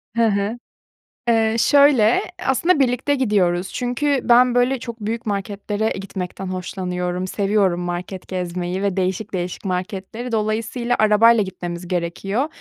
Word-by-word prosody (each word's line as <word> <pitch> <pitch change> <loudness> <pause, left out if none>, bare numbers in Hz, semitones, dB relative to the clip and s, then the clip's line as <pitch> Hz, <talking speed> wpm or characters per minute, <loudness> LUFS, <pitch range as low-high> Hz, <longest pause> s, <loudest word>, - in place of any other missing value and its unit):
Hı 230 -1 +3
hı. 205 +3 0 0.7
Eee, 225 -1 +3
şöyle, 280 -6 +5 0.2
aslında 295 +5 +2
birlikte 265 +2 +1
gidiyoruz 195 -7 +1
çünkü 260 +3 0
ben 245 +1 +5
böyle 245 +1 +2
çok 235 -2 -7
büyük 225 +3 -4
marketlere 205 +1 -2
gitmekten 190 -1 -5
hoşlanıyorum, 180 0 -3
seviyorum 195 -3 +1
market 175 +1 -5
gezmeyi 180 0 -3
ve 195 -1 -1
değişik 190 +3 -2
değişik 180 +2 -4
marketleri. 195 +6 -4
Dolayısıyla 225 +3 -1
arabayla 215 +1 +5
gitmemiz 175 -2 -6
gerekiyor. 190 - -2
205 Hz, 125 wpm, -21 LUFS, 185-235 Hz, 0.7 s, şöyle